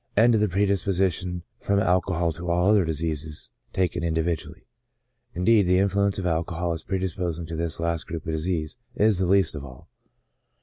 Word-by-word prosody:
and 115 +2 +6
to 110 - +3
the 105 - +3
predisposition 95 -2 0 0.2
from 100 - 0
alcohol 90 -2 +1
to 85 +2 -5
all 90 +4 +3
other 105 -3 +5
diseases 80 -1 -3 0.2
taken 90 -2 -1
individually. 80 0 -2 0.7
Indeed, 100 +2 +4
the 90 0 +4
influence 100 +1 +2
of 95 - -3
alcohol, 85 0 -1
as 80 - -4
predisposing 90 -3 -3
to 80 +1 -6
this 85 -1 -2
last 85 -1 -1
group 80 -2 -6
of 80 - -2
disease, 80 +3 -2 0.2
is 105 -3 +3
the 95 - +1
least 95 -4 +3
of 75 - -6
all. 65 -2 -12
90 Hz, 170 wpm, -25 LUFS, 80-95 Hz, 0.7 s, and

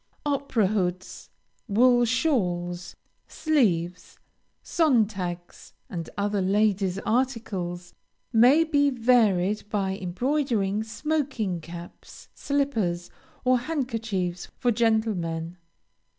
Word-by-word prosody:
Opera 280 -6 +1
hoods, 185 -2 -2 0.4
wool 240 +3 +4
shawls, 180 - -1 0.3
sleeves, 180 - 0 0.5
Sontags, 205 - 0 0.2
and 170 -3 -5
other 205 0 0
ladies' 195 -1 +1
articles, 210 -8 -2 0.4
may 250 +8 +6
be 285 -3 +2
varied 215 -6 +2
by 195 -3 -1
embroidering 215 +1 -1
smoking 250 - -2
caps, 170 +1 -11
slippers, 225 -12 -1 0.3
or 255 0 +4
handkerchiefs 225 - -3
for 245 - +1
gentlemen. 190 -7 0
215 Hz, 80 wpm, -26 LUFS, 180-255 Hz, 0.5 s, may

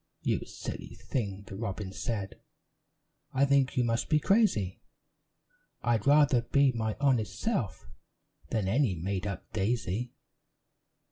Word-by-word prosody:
"You - - 0
silly - - -7
thing!" 100 -5 -3
the 100 - -8
robin 100 -2 -4
said, 100 -1 -4 0.9
"I 135 +1 +4
think 140 -1 +2
you 125 - +4
must 115 0 0
be 155 - +5
crazy; 150 - +2 1.0
I'd 115 -2 +1
rather 140 -4 +5
be 140 +3 +3
my 110 -3 -2
honest 130 -7 +1
self 195 - -2 0.6
Than 105 -4 0
any 115 -1 +2
made 95 +4 -2
up 95 0 -6
daisy. 110 +2 -1
115 Hz, 125 wpm, -30 LUFS, 100-135 Hz, 1.0 s, be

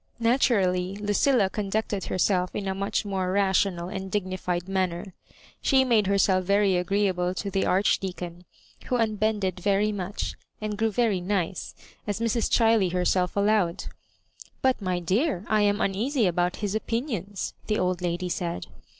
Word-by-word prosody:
Natu 240 +1 +3
rally 185 -1 0
Lucilla 205 +3 +2
conducted 205 0 -2
herself 180 0 0
in 200 - -3
a 190 - 0
much 195 +2 -1
more 190 -2 -1
rational 190 -2 +1
and 190 0 -5
dignified 185 -3 -2
manner. 185 -1 -2 0.5
She 265 -2 +4
made 225 -5 +3
her 200 0 +2
self 185 -1 +3
very 200 0 +3
agreeable 180 0 0
to 200 +1 -4
the 195 0 0
Archdeacon, 180 -2 0 0.4
who 250 - +1
un 220 -2 +1
bended 205 -4 0
very 200 +3 +2
much, 200 0 -4 0.3
and 215 -1 -3
grew 220 +2 +1
very 210 -4 +1
nice, 185 -1 -2 0.3
as 205 +1 -2
Mrs. 230 -1 0
Chiley 225 -5 +3
herselt* 180 0 +1
allowed. 200 -4 +1 0.4
" - - -20
But, 260 -3 +2
my 185 -2 -1
dear, 195 - 0
I 215 -1 +2
am 205 0 +2
uneasy 225 +6 +1
about 175 0 +1
his 200 - -2
opinions," 220 - -3
the 215 - +1
old 180 -1 0
lady 175 +1 -1
said. 170 - -3
195 Hz, 160 wpm, -26 LUFS, 180-210 Hz, 0.5 s, She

